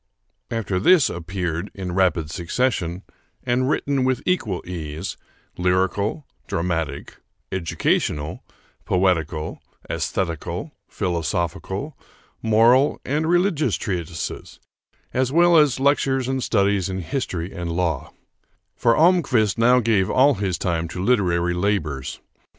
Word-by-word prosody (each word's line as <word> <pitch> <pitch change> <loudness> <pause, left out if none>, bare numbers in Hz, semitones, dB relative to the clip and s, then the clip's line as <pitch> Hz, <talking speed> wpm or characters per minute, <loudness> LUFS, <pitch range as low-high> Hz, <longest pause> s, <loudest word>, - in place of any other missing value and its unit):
After 100 -5 -1
this 170 - +5
appeared 85 +1 -3
in 95 -2 -4
rapid 85 -4 +1
succession, 90 0 -1 0.4
and 125 +2 +1
written 140 -2 0
with 130 0 0
equal 120 - 0
ease, 80 0 -5 0.4
lyrical, 95 - 0 0.2
dramatic, 80 -4 -3 0.3
educational, 80 -4 -1 0.4
poetical, 80 -4 0 0.3
aesthetical, 85 -5 -3 0.2
philosophical, 90 - -2 0.5
moral, 115 +5 +4
and 155 +4 0
religious 175 - +2
treatises, 85 -3 -5 0.5
as 130 0 +1
well 170 +2 +5
as 150 -5 +4
lectures 135 -2 +2
and 130 0 -1
studies 100 -4 +1
in 95 0 -3
history 90 - -3
and 90 -3 -4
law; 85 -4 -1 0.6
for 115 - +2
Almquist 140 - +3
now 125 +2 +5
gave 105 -5 +2
all 140 +3 +5
his 95 -6 -2
time 85 -1 -1
to 90 +3 -5
literary 90 -7 +2
labors. 85 -8 -1
95 Hz, 110 wpm, -22 LUFS, 85-130 Hz, 0.6 s, this